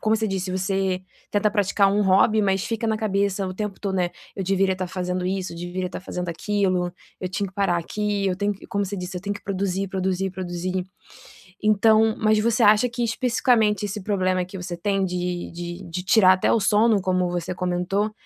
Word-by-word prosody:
como 220 +1 +2
você 220 0 -1
disse, 190 -1 -2
você 190 0 -1 0.3
tenta 210 +1 +2
praticar 200 -1 +3
um 205 +1 +2
hobby 205 +3 +4
mas 195 -1 +1
fica 230 0 -3
na 220 -1 +1
cabeça 200 -2 0
o 185 - -5
tempo 210 -1 -4
todo, 195 -2 -2
né: 180 - +2
"Não, - - -24 0.2
eu 195 - -2
deveria 195 0 +2
estar 185 0 -3
fazendo 180 0 -3
isso, 185 -2 -2
deveria 175 +2 -4
estar 180 - -6
fazendo 180 -1 -5
aquilo, 185 0 0 0.3
eu 185 - -2
tinha 200 +2 -2
que 185 - -18
parar 195 -4 +1
aqui, 205 +3 -2
eu 185 - +1
tenho 205 +1 0
que", - - -14
como 200 0 -1
você 200 +1 -5
disse: 180 0 -5
"Tenho 205 +1 -3
que 205 - -10
produzir, 195 0 -1
produzir, 190 0 -1
produzir". 180 0 -3 0.8
Então, 220 +1 +4
mas 215 0 +3
você 230 +2 +1
acha 215 +3 +5
que 240 0 -3
especificamente 230 -3 +2
esse 205 0 -4
problema 185 -2 +1
que 190 +1 -9
você 180 -1 -5
tem 195 +1 0
de 180 -1 -3
de 175 +2 -6
de 180 +2 -4
tirar 185 -1 +6
até 185 - +1
o 230 - +3
sono, 210 +1 +3
como 185 -1 +1
você 175 +1 -3
comentou, 180 +4 -1
195 Hz, 205 wpm, -24 LUFS, 185-210 Hz, 0.8 s, tirar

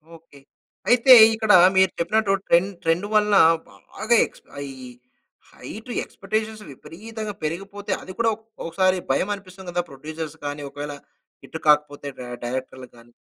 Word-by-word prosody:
Okay. 160 -3 -18 0.5
అయితే 250 +2 +7 0.2
ఇక్కడ 220 -1 +1 0.3
మీరు 190 -1 +5
చెప్పినట్టు 205 +3 +1
ట్రెండ్, 175 +4 +3
ట్రెండ్ 165 +5 0
వల్ల 210 0 +3 0.4
బాగా 230 +2 -1 0.2
క్స్ - - -20 0.2
అయి 140 -1 -6 0.8
హైటు 225 +4 -10
ఎక్స్‌పెక్టేషన్స్ 215 +2 -4
విపరీతంగా 215 - -8
పెరిగిపోతే 195 +6 -5
అది 185 - -9
కూడా 230 -1 +2 0.4
ఒకసారి 185 +3 +1
భయమనిపిస్తుంది 190 -2 -3
కదా 175 0 -1
ప్రొడ్యూసర్స్ 155 +3 -8
గాని 145 0 -4
ఒకవేళ 145 +1 -6 0.5
హిట్ 160 - -8
కాకపోతే 150 -1 +2
డ - - -6 0.2
డైరెక్టర్‌లకి 130 0 -6
గాని? 120 +1 -19
185 Hz, 125 wpm, -23 LUFS, 150-210 Hz, 0.8 s, అయితే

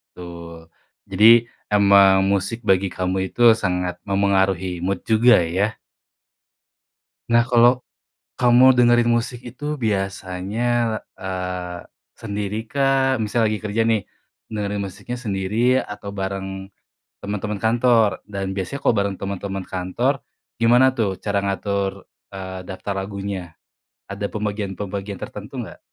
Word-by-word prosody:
Betul. 85 -2 -10 0.4
Jadi 100 +3 +3 0.5
emang 100 -1 +6
musik 100 +3 0
bagi 95 0 +3
kamu 95 +1 -2
itu - - -6
sangat 90 -4 -2
memengaruhi 95 -2 +1
mood 95 +1 -1
juga, 115 +2 +5
ya? 95 +6 -1 1.5
Nah 115 0 +4
kalo 120 +1 +4 0.5
kamu 125 +1 +6
dengerin 120 -1 +4
musik 120 +1 -2
itu 145 +4 -5
biasanya, 95 -1 -2 0.5
eee, 90 -1 -5 0.4
sendirikah? 115 +6 0
Misal 110 +1 +1
lagi 105 0 -2
kerja 105 +2 0
nih, 110 -4 +2 0.5
dengerin 105 -1 -2
musiknya 100 +6 -6
sendiri 115 +3 +1
atau 105 -2 -7
bareng 95 0 -5 0.5
teman-teman 105 0 -4
kantor? 115 -2 +2
Dan 95 -1 -5
biasanya 100 +9 -4
kalo 120 - +2
bareng 100 -1 0
teman-teman 95 -1 -4
Kantor, 95 +9 -1 0.4
gimana 120 +3 +5
tuh 100 -5 -1
cara 100 -1 -1
ngatur, 100 0 -2 0.2
eee, 95 -1 -6
daftar 95 +2 -5
lagunya? 95 -2 -5 0.6
Ada 100 +1 -3
pembagian-pembagian 100 0 -4
tertentu - - -7
nggak? - - -11
100 Hz, 115 wpm, -22 LUFS, 95-115 Hz, 1.5 s, emang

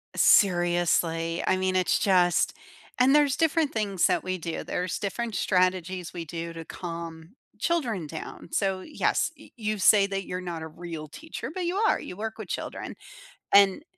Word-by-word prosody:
Seriously. 175 -2 +3
I 185 - +2
mean, 185 0 0
it's 180 -2 +2
just 180 -3 +3 0.4
and 255 +1 +5
there's 290 -2 +4
different 320 -2 +1
things 200 -4 +1
that - - +1
we 185 0 -2
do. 165 -1 -4
There's 180 -1 -2
different 225 +2 -3
strategies 185 -1 0
we 170 - -5
do 165 +1 -6
to 165 0 -7
calm 165 +2 -7 0.2
children 235 - -1
down. 160 +2 -8
So, 195 -1 +1
yes, 305 - 0
y - - -15
you 215 -2 -2
say 200 +1 +5
that 195 -1 -3
you're 180 - -4
not 170 -3 -5
a 160 - -5
real 160 -1 -7
teacher, 320 - -7
but 365 0 -3
you 350 +2 -1
are, 440 +3 +2
you - - -8
work 220 +2 -5
with - - -7
children. - - -5 0.6
And, 200 +7 +6
185 Hz, 170 wpm, -27 LUFS, 170-215 Hz, 0.6 s, And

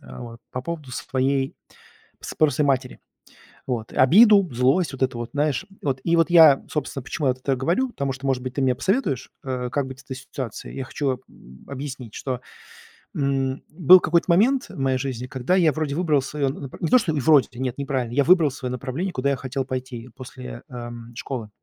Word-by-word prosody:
а - - -11
вот, 115 -1 -9
по 125 - -4
поводу 155 -4 -6
своей 135 +1 -1 0.7
с - - -6
спросы 155 0 +2
матери. 130 -3 0 0.7
Вот. 115 -5 -3
Обиду, 200 - +6
злость, 135 +8 +2
вот 135 - -2
это 130 -2 -1
вот, 120 0 -5
знаешь, 145 +4 0 0.2
вот. 135 -2 -1
И 170 - +3
вот 165 0 +3
я, 160 -5 +7
собственно, 145 -3 -3
почему 145 +1 -2
я 130 - +3
вот 130 - -18
это 135 0 0
говорю. 175 - 0
Потому 140 - -3
что, 130 +2 -9
может 135 -2 0
быть, 130 0 -5
ты 140 - -2
мне 130 -1 +3
посоветуешь, 145 - -1
э, 125 -2 -3
как 140 +2 -1
быть 130 0 -9
с - - -15
этой 130 - -6
ситуацией. 130 -3 -7
Я 130 - -4
хочу, 130 -1 -2
м, 65 +1 -17
объяснить, 135 -4 -7
что, 130 -3 -4 0.7
м, 135 -1 -1
был 180 +3 +7
какой-то 170 +1 +1
момент 250 +10 +3
в - - -10
моей 135 -1 +1
жизни, 125 -2 -4
когда 130 +7 0
я 165 -5 +4
вроде 150 -1 -2
выбрал 155 -4 +2
своё 140 +1 -2
напр 135 0 -6
не 165 - 0
то 255 - +6
что 190 -8 -1
и 150 - 0
вроде 140 0 +4
т 125 - -13
нет, 130 -1 -2
неправильно. 130 -4 -2
Я 140 - +3
выбрал 165 -1 +5
своё 130 -2 -5
направление, 135 +9 -3
куда 140 -2 0
я - - +1
хотел 130 0 -4
пойти 130 -2 -5
после, 130 -2 -9
ам, 120 -1 -8
школы. 120 -3 -5
135 Hz, 210 wpm, -23 LUFS, 125-150 Hz, 0.7 s, я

